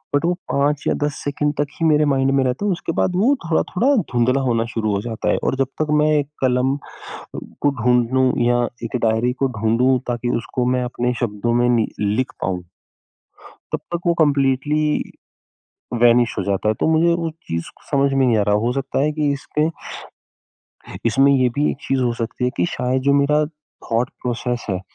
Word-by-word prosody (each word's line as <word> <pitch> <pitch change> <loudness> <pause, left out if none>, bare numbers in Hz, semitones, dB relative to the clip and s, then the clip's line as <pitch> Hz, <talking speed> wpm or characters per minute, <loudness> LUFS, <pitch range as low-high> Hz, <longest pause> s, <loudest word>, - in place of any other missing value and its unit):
but 145 - +1
वो 175 - +2 0.2
5 145 +1 +1
या - - +3
10 145 -1 -1
second 145 +1 -1
तक 145 - +1
ही 165 - +1
मेरे 150 -1 +4
माइंड 135 0 +2
में 135 -1 +2
रहता 130 +11 -1
है 200 - +2
उसके 170 -1 -3
बाद 180 - +1
वो 245 +10 +3
थोड़ा-थोड़ा 220 - +1 0.2
धुँधला 125 +3 +2
होना 115 -3 +1
शुरू 110 -2 -1
हो 100 - -1
जाता 115 -1 -3
है - - +1
और - - +1
जब 135 -1 0
तक 155 - +1
मैं 155 0 +3
एक 140 0 -3
कलम 130 +2 +2 0.9
को - - +5
ढूँढ़ू 125 +1 +3 0.2
या 120 0 +3 0.2
एक 115 - -3
डायरी 110 +3 +1
को - - +4
ढूँढ़ू 125 +4 +3
ताकि 120 0 -2
उसको 125 +2 -2
मैं 125 - 0
अपने 125 0 -1
शब्दों 115 +1 -1
में 120 - +3
नि 115 -2 +2
लिख 105 +5 0
पाऊँ 90 -1 -2 1.1
तब - - 0
तक 170 - -1
वो 170 - +4
कंप्लीटली 145 +1 +2 1.0
वैनिश 120 0 +4
हो 95 - 0
जाता 100 +1 -1
है - - +3
तो - - +1
मुझे 170 +2 +3
वो 165 - -1 0.2
चीज़ 85 0 -3 0.2
समझ 140 -1 +2
में 135 -1 +3
नहीं 115 -3 +3
आ - - +3
रहा 105 - +4
हो 120 - +1
सकता 135 0 -2
है 150 +2 +2
कि 150 -1 0
इसके 150 +2 -1 1.4
इसमें 135 +4 +4
ये 130 -2 +3
भी 150 - +3
एक - - -5
चीज़ 135 -1 +1
हो 120 -1 +1
सकती 125 +2 -3
है 125 - +1
कि 90 - +1
शायद 130 +1 -1
जो 140 +1 +3
मेरा 150 +2 +2
थॉट 145 -6 -4
प्रोसेस 120 0 -3
है, 95 -1 -1
130 Hz, 195 wpm, -20 LUFS, 120-145 Hz, 1.4 s, को